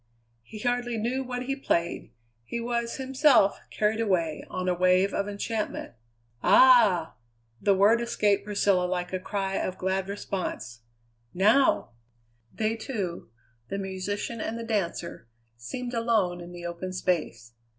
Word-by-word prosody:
He 170 Hz, -, -11 dB
hardly 245 Hz, 0 st, -1 dB
knew 245 Hz, +5 st, -1 dB
what 250 Hz, -1 st, -4 dB
he 270 Hz, +2 st, -2 dB
played; 170 Hz, -11 st, -1 dB, 0.3 s
he 235 Hz, -, -4 dB
was 235 Hz, 0 st, -2 dB
himself, 265 Hz, -5 st, +3 dB
carried 215 Hz, +1 st, 0 dB
away 170 Hz, -8 st, 0 dB
on 185 Hz, 0 st, -3 dB
a 180 Hz, -, +3 dB
wave 185 Hz, +2 st, +3 dB
of 200 Hz, -, -1 dB
enchantment. 210 Hz, -, -3 dB, 0.5 s
"Ah!" 220 Hz, -10 st, +6 dB, 0.5 s
The 200 Hz, -, +4 dB
word 210 Hz, +5 st, +4 dB
escaped 210 Hz, -4 st, +1 dB
Priscilla 200 Hz, -3 st, +2 dB
like 180 Hz, 0 st, -3 dB
a 185 Hz, -, 0 dB
cry 195 Hz, 0 st, -2 dB
of 185 Hz, -, -2 dB
glad 190 Hz, +1 st, -1 dB
response. 180 Hz, -, -4 dB, 0.6 s
"Now!" 215 Hz, -, +3 dB, 0.6 s
They 220 Hz, 0 st, -1 dB
two, 205 Hz, -, -5 dB, 0.4 s
the 195 Hz, -, -3 dB
musician 200 Hz, +4 st, -4 dB
and 225 Hz, -, -3 dB
the 230 Hz, -, -5 dB
dancer, 175 Hz, -, -3 dB, 0.3 s
seemed 240 Hz, -, -6 dB
alone 220 Hz, -7 st, +1 dB
in 175 Hz, 0 st, -9 dB
the 175 Hz, 0 st, -8 dB
open 175 Hz, +2 st, -5 dB
space. 150 Hz, -, -2 dB
200 Hz, 140 wpm, -27 LUFS, 180-230 Hz, 0.6 s, Ah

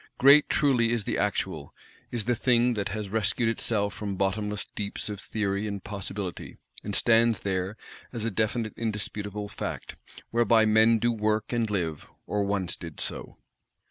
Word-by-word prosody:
Great 140 Hz, +3 st, +7 dB
truly 130 Hz, -6 st, +3 dB
is 120 Hz, -3 st, 0 dB
the -, -, -2 dB
Actual; -, -, -2 dB, 0.3 s
is 120 Hz, -3 st, -3 dB
the 120 Hz, -, +2 dB
Thing 120 Hz, +1 st, +3 dB
that 105 Hz, -3 st, -2 dB
has 105 Hz, 0 st, -4 dB
rescued 110 Hz, +2 st, +1 dB
itself 105 Hz, -2 st, 0 dB
from 100 Hz, -2 st, -4 dB
bottomless 105 Hz, +2 st, -1 dB
deeps 100 Hz, 0 st, -3 dB
of 105 Hz, -2 st, -5 dB
theory 100 Hz, -1 st, -2 dB
and 100 Hz, -2 st, -5 dB
possibility, 100 Hz, -2 st, -6 dB, 0.3 s
and 100 Hz, -1 st, -2 dB
stands 115 Hz, -2 st, +4 dB
there 95 Hz, +1 st, -2 dB, 0.3 s
as 115 Hz, -3 st, -4 dB
a 115 Hz, -, 0 dB
definite 110 Hz, +1 st, -1 dB
indisputable 105 Hz, -2 st, -3 dB
Fact, -, -, -6 dB, 0.4 s
whereby 115 Hz, -1 st, +4 dB
men 110 Hz, +1 st, +5 dB
do 120 Hz, +2 st, +1 dB
work 110 Hz, 0 st, 0 dB
and 115 Hz, -2 st, +1 dB
live, 85 Hz, -7 st, -2 dB, 0.2 s
or 105 Hz, -1 st, 0 dB
once 100 Hz, -3 st, -1 dB
did 80 Hz, -4 st, -9 dB
so. -, -, -5 dB
105 Hz, 160 wpm, -27 LUFS, 100-115 Hz, 0.4 s, Great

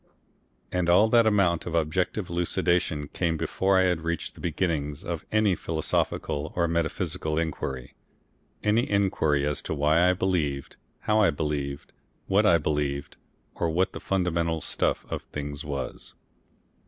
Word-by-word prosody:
And 90 Hz, -1 st, 0 dB
all 100 Hz, +6 st, +5 dB
that 115 Hz, -1 st, +5 dB
amount 95 Hz, -6 st, +2 dB
of 85 Hz, -, -3 dB
objective 90 Hz, +4 st, 0 dB
elucidation 85 Hz, -3 st, +1 dB
came 85 Hz, -2 st, -1 dB
before 95 Hz, +4 st, +1 dB
I 95 Hz, -, +5 dB
had 90 Hz, -3 st, +1 dB
reached 85 Hz, 0 st, -3 dB
the -, -, -14 dB
beginnings 80 Hz, -4 st, -2 dB
of 85 Hz, -2 st, -5 dB
any 110 Hz, -2 st, +3 dB
philosophical 80 Hz, -2 st, -1 dB
or 85 Hz, -1 st, +2 dB
metaphysical 85 Hz, -1 st, -1 dB
inquiry, 70 Hz, -6 st, -3 dB, 0.7 s
any 110 Hz, +3 st, +2 dB
inquiry 80 Hz, -8 st, +2 dB
as 75 Hz, -1 st, -1 dB
to -, -, -3 dB
why 80 Hz, +5 st, +4 dB
I -, -, +4 dB
believed, 85 Hz, -7 st, -1 dB, 0.3 s
how 105 Hz, 0 st, +2 dB
I 105 Hz, -, +5 dB
believed, 70 Hz, -2 st, -3 dB, 0.3 s
what 105 Hz, +2 st, +3 dB
I 85 Hz, -, +6 dB
believed, 75 Hz, -2 st, -2 dB, 0.4 s
or 85 Hz, -, -1 dB
what 90 Hz, +4 st, +1 dB
the -, -, -6 dB
fundamental 85 Hz, -4 st, 0 dB
stuff -, -, 0 dB
of -, -, -2 dB
things 75 Hz, 0 st, -6 dB
was. 70 Hz, -3 st, -5 dB
85 Hz, 145 wpm, -26 LUFS, 75-90 Hz, 0.7 s, I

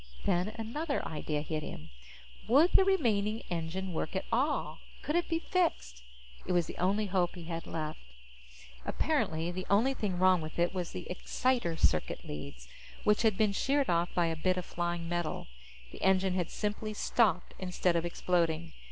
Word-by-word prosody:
Then 180 Hz, +4 st, +1 dB
another 280 Hz, +7 st, -2 dB
idea 150 Hz, -1 st, -2 dB
hit 155 Hz, 0 st, -3 dB
him. 80 Hz, -, -8 dB, 0.6 s
Would 285 Hz, +10 st, +6 dB
the -, -, +6 dB
remaining 225 Hz, -, +2 dB
engine 175 Hz, +2 st, -3 dB
work 160 Hz, +2 st, -3 dB
at 190 Hz, -, -1 dB
all? 270 Hz, +6 st, 0 dB, 0.2 s
Could 300 Hz, -, -1 dB
it 345 Hz, -, +1 dB
be 330 Hz, -, +2 dB
fixed? 325 Hz, -, -1 dB, 0.5 s
It -, -, +1 dB
was 175 Hz, -2 st, +3 dB
the -, -, -8 dB
only 200 Hz, +4 st, +2 dB
hope 185 Hz, -2 st, 0 dB
he 175 Hz, -, -8 dB
had 165 Hz, 0 st, -5 dB
left. 155 Hz, -1 st, -4 dB, 0.8 s
Apparently, 160 Hz, +2 st, 0 dB
the 185 Hz, +1 st, -5 dB
only 230 Hz, +7 st, +4 dB
thing 200 Hz, -8 st, -2 dB
wrong 185 Hz, -1 st, +5 dB
with 155 Hz, 0 st, -7 dB
it 175 Hz, +1 st, +2 dB
was 180 Hz, -3 st, -2 dB
the 180 Hz, -, -7 dB
exciter 180 Hz, -1 st, 0 dB
circuit 80 Hz, -, +1 dB
leads, 70 Hz, -4 st, -7 dB, 0.4 s
which 210 Hz, 0 st, +3 dB
had 220 Hz, -4 st, +3 dB
been 215 Hz, -2 st, +3 dB
sheared 275 Hz, +3 st, +1 dB
off 170 Hz, +1 st, +1 dB
by 175 Hz, -, +3 dB
a 165 Hz, -1 st, 0 dB
bit 185 Hz, +3 st, +1 dB
of 180 Hz, -, -3 dB
flying 175 Hz, -1 st, -2 dB
metal. 175 Hz, -2 st, -2 dB, 0.5 s
The -, -, -11 dB
engine 190 Hz, 0 st, +3 dB
had 180 Hz, -2 st, -1 dB
simply 215 Hz, 0 st, -3 dB
stopped 200 Hz, -6 st, +2 dB
instead 180 Hz, -1 st, 0 dB
of 165 Hz, -, +2 dB
exploding. 170 Hz, -2 st, 0 dB
180 Hz, 175 wpm, -31 LUFS, 170-215 Hz, 0.8 s, Would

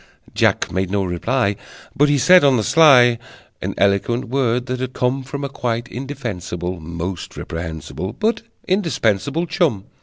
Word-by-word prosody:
Jack -, -, +1 dB
made 95 Hz, +1 st, -1 dB
no 100 Hz, 0 st, 0 dB
reply, 100 Hz, +5 st, 0 dB, 0.4 s
But 145 Hz, +1 st, +3 dB
he 145 Hz, -, +3 dB
said 180 Hz, +6 st, +6 dB
on 135 Hz, -3 st, +5 dB
the 110 Hz, -, 0 dB
sly 125 Hz, -6 st, +6 dB, 0.4 s
An -, -, -4 dB
eloquent 100 Hz, +6 st, +1 dB
word, 125 Hz, -2 st, 0 dB
that 130 Hz, -1 st, -3 dB
had 130 Hz, 0 st, -4 dB
come 125 Hz, +2 st, 0 dB
From 140 Hz, +2 st, -6 dB
a -, -, -1 dB
quite 120 Hz, -3 st, -3 dB
indefensible, 95 Hz, -9 st, -5 dB
Most 85 Hz, +2 st, -6 dB
reprehensible, 80 Hz, +3 st, -6 dB
But 225 Hz, +2 st, -1 dB, 0.3 s
indispensable 165 Hz, -, 0 dB
Chum. 150 Hz, -, 0 dB
120 Hz, 150 wpm, -20 LUFS, 95-140 Hz, 0.4 s, said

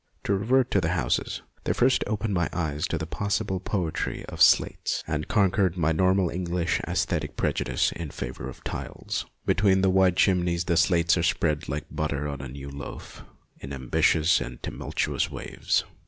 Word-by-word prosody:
To 100 Hz, -, +1 dB
revert 120 Hz, +6 st, +2 dB
to 100 Hz, -, +3 dB
the 85 Hz, +1 st, 0 dB
houses, -, -, -1 dB, 0.2 s
they -, -, +1 dB
first 130 Hz, +1 st, +3 dB
opened 105 Hz, 0 st, -1 dB
my 85 Hz, -2 st, +1 dB
eyes 80 Hz, -1 st, -1 dB
to 85 Hz, -, -2 dB
the 80 Hz, -, -3 dB
possible 100 Hz, +2 st, -1 dB
poetry 90 Hz, -4 st, -2 dB
of -, -, -7 dB
slates, -, -, +4 dB
and 75 Hz, 0 st, -2 dB
conquered 95 Hz, -3 st, +2 dB
my 80 Hz, -2 st, +2 dB
normal 95 Hz, +2 st, +2 dB
English 90 Hz, 0 st, -1 dB
aesthetic -, -, -1 dB
pre -, -, +1 dB
judice 65 Hz, 0 st, 0 dB
in 85 Hz, -3 st, -6 dB
favour 65 Hz, -1 st, -6 dB
of 65 Hz, -, -12 dB
tiles. -, -, -4 dB, 0.2 s
Between 95 Hz, -2 st, +3 dB
the 95 Hz, -1 st, +3 dB
wide 95 Hz, -1 st, +4 dB
chimneys 90 Hz, -3 st, +2 dB
the 85 Hz, -, +1 dB
slates 85 Hz, 0 st, +3 dB
are -, -, +2 dB
spread 80 Hz, -3 st, 0 dB
like 70 Hz, +3 st, -3 dB
butter 75 Hz, -1 st, -2 dB
on 70 Hz, -2 st, -5 dB
a 65 Hz, -, -6 dB
new 70 Hz, +2 st, -8 dB
loaf, 70 Hz, +1 st, -8 dB, 0.4 s
in 70 Hz, -, -8 dB
ambitious 70 Hz, +5 st, +2 dB
and -, -, -7 dB
tumultuous -, -, -2 dB
waves. -, -, -1 dB
85 Hz, 175 wpm, -26 LUFS, 75-95 Hz, 0.4 s, slates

